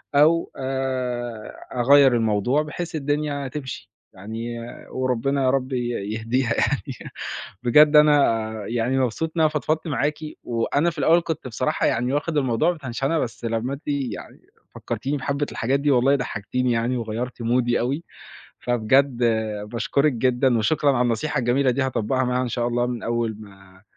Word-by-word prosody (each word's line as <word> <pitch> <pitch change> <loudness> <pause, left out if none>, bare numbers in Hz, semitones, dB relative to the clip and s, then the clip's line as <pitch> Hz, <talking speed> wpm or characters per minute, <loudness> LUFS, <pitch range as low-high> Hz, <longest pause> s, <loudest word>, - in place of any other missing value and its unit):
أو 160 +3 +4
آآ، 130 -4 -3 0.2
أغيّر 135 +1 +6
الموضوع 115 +5 +1
بحيث 165 +3 -5
الدنيا 145 -1 -1
تمشي. 130 -2 -7 0.2
يعني 115 +4 -6 0.3
وربنا 130 +2 0
يا 130 - +3
رب 130 0 0
ي 125 - +1 0.4
يهديها 115 +2 0
يعني، - - -2 0.5
بجد 150 +5 +6
أنا 140 -8 +4 0.2
يعني 120 +3 0
مبسوط 130 +6 -1
إن 165 - +1
أنا 155 - +5
فضفضت 155 +2 -1
معاكِ، 150 +1 0 0.3
وأنا 130 +7 0
في 165 - -9
الأول 165 +4 +4
كنت 160 -5 -4
بصراحة 110 -5 -1
يعني 125 +3 +1
واخد 150 +2 -1
الموضوع 130 +4 +2
بتنشنة 140 0 -2
بس 115 -2 -4
لمّا 115 +3 -1
أنتِ 140 - -7
يعني 140 -6 -4 0.3
فكّرتيني 145 +2 -3
بحبِّة 140 +2 -1
الحاجات 135 +5 0
دي 145 +1 +2
والله 135 +2 +4
ضحكتيني 125 0 -2
يعني، 120 +2 0
وغيرتِ 120 +2 -4
مودي 120 +1 +1
أوي، 135 +7 -1 0.6
فبجد 125 +3 +2 0.5
باشكرِك 140 +5 +1
جدًا، 125 0 +2
وشكرًا 140 +6 +2
على 125 -1 +2
النصيحة 120 +5 0
الجميلة 125 +2 +2
دي، 130 +2 0
هاطبّقها 130 0 0
معاها 125 +1 0
إن 125 - -2
شاء 120 +1 -1
الله 120 0 0
من 125 -2 -4
أول 115 -2 -1
ما 95 -2 -16
130 Hz, 155 wpm, -23 LUFS, 120-140 Hz, 0.6 s, أغيّر